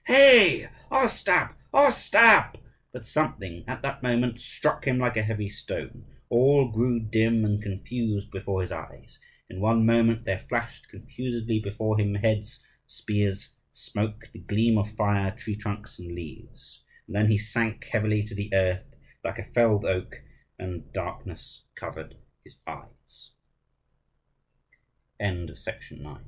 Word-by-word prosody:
"Hey, 255 -8 +8 0.2
Ostap, - - +2 0.2
Ostap!" 230 -5 +6 0.4
But 125 -3 -10
something 100 - -3
at 130 - -6
that 140 0 -4
moment 120 -1 0
struck 150 +4 -2
him 130 -2 +2
like 125 -1 0
a 110 - +1
heavy 105 -1 -3
stone. 100 - -8 0.2
All 135 +2 +4
grew 120 +2 0
dim 110 0 +1
and 105 0 0
confused 105 +1 -4
before 95 -1 -3
his 90 - -5
eyes. - - -10 0.3
In 95 - -10
one 110 +2 +2
moment 115 0 +3
there 95 -1 -3
flashed 115 -1 -4
confusedly 115 +1 -4
before 110 +1 -2
him 100 -1 0
heads, 105 0 -2 0.2
spears, 105 -2 -3 0.2
smoke, 105 +2 -5
the - - -12
gleam 110 +1 +1
of 105 +1 -2
fire, 100 -2 0
tree 105 - -5
trunks, 105 0 -7
and 85 -1 -9
leaves; 85 -3 -11 0.2
and - - -10
then 105 +1 +3
he 110 -1 +4
sank 110 +1 -2
heavily 105 -2 0
to 105 +1 -10
the 100 +1 -6
earth 95 -1 0 0.3
like - - -4
a - - -6
felled 115 -4 +2
oak, 90 -1 -3
110 Hz, 120 wpm, -26 LUFS, 105-120 Hz, 0.4 s, Hey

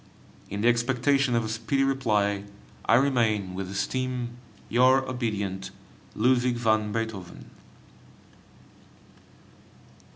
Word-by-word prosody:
In 100 +1 -4
the 115 - +3
expectation 125 +2 +2
of 115 -1 +1
a - - -3
speedy 135 +5 0
reply, 105 -7 +1 0.4
I - - +6
remain, 115 -7 +2
with 95 0 -5
esteem, 125 +4 -2 0.4
Your 130 +2 +4
obedient 105 -6 -3 0.5
LUDWIG 125 +1 +2
VAN 110 -3 +1
BEETHOVEN. 110 -5 -5
115 Hz, 95 wpm, -26 LUFS, 105-130 Hz, 0.5 s, I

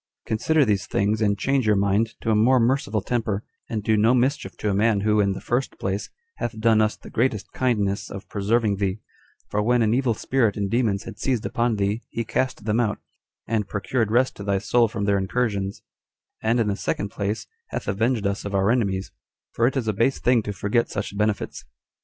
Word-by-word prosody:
Consider 145 +7 +2
these 100 -3 0
things, 105 +2 0
and 100 -2 +2
change 135 +1 +1
your 105 - +4
mind 100 +3 +1
to 115 - 0
a - - +3
more 125 +4 +4
merciful 115 -3 +1
temper, 110 -4 -1 0.3
and 110 -2 -2
do 110 +1 +3
no 110 +4 +4
mischief 125 -6 0
to 105 - -1
a - - 0
man, 105 0 +2
who, 105 +1 +2
in 100 -1 +2
the 95 - -6
first 125 +3 -2
place, 95 +1 -3 0.3
hath 110 -2 -4
done 110 -1 +4
us 110 0 +1
the - - -13
greatest 115 -4 0
kindness 105 -6 0
of 100 - -8
preserving 105 0 +1
thee; 100 0 -1 0.5
for 105 - +1
when 120 +2 +3
an 110 0 +2
evil 125 -2 +1
spirit 115 -3 +1
and 100 -1 -2
demons 110 -5 +1
had 115 -2 -9
seized 125 -4 0
upon 120 -1 0
thee, 100 +2 0
he 115 - -3
cast 130 -2 -1
them 110 +1 +1
out, 110 -3 +1 0.5
and 110 -3 -1
procured 110 +2 -1
rest 125 +4 +2
to 100 - -7
thy 100 -1 +1
soul 115 +4 +3
from 105 -2 -3
their 100 -1 +2
incursions: 100 -1 -1 0.6
and, 115 +2 +2
in 115 - +2
the 100 - 0
second 100 0 -2
place, 100 +2 -3 0.2
hath - - -5
avenged 110 +2 0
us 100 0 -1
of 100 -1 -4
our 100 +2 +3
enemies; 100 -6 0 0.4
for 115 - +2
it 135 - -1
is 120 -4 -1
a 110 - +1
base 115 +7 +2
thing 125 -2 +3
to 105 - -4
forget 100 +4 0
such 100 -1 -4
benefits." 105 0 -1
110 Hz, 210 wpm, -24 LUFS, 100-120 Hz, 0.6 s, your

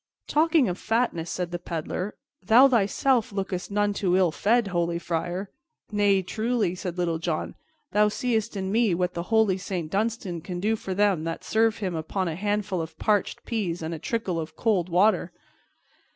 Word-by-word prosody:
"Talking 310 -3 +3
of 180 +1 -3
fatness," 220 -7 0
said 180 -1 -3
the 175 - -3
Peddler, 175 +3 -4 0.3
"thou 245 +4 +7
thyself 235 +1 +2
lookest 195 -2 -3
none 205 0 +1
too 185 -3 +1
ill 185 -3 +3
fed, 220 +5 +2
holy 170 -1 0
friar." 175 +3 -3 0.4
"Nay, 205 -2 +3
truly," 220 -1 0
said 180 -1 -5
Little 170 -2 0
John, 165 -1 -2 0.4
"thou 210 0 +4
seest 220 -1 -1
in 190 0 -2
me 220 -4 +3
what 180 +1 -1
the 170 - -3
holy 220 -4 +3
Saint 180 -4 -4
Dunstan 205 -4 -1
can 180 +1 -5
do 215 +4 +1
for 190 -3 -5
them 200 -5 +2
that 165 0 -4
serve 225 0 +2
him 190 -4 -3
upon 170 +4 -2
a 165 - -2
handful 205 -1 -1
of 160 - -7
parched 210 -3 0
peas 185 -8 -2
and 160 +1 -3
a 160 - -5
trickle 190 -2 -2
of 160 0 -6
cold 195 -6 +1
water." 180 0 +3
195 Hz, 180 wpm, -26 LUFS, 175-220 Hz, 0.4 s, thou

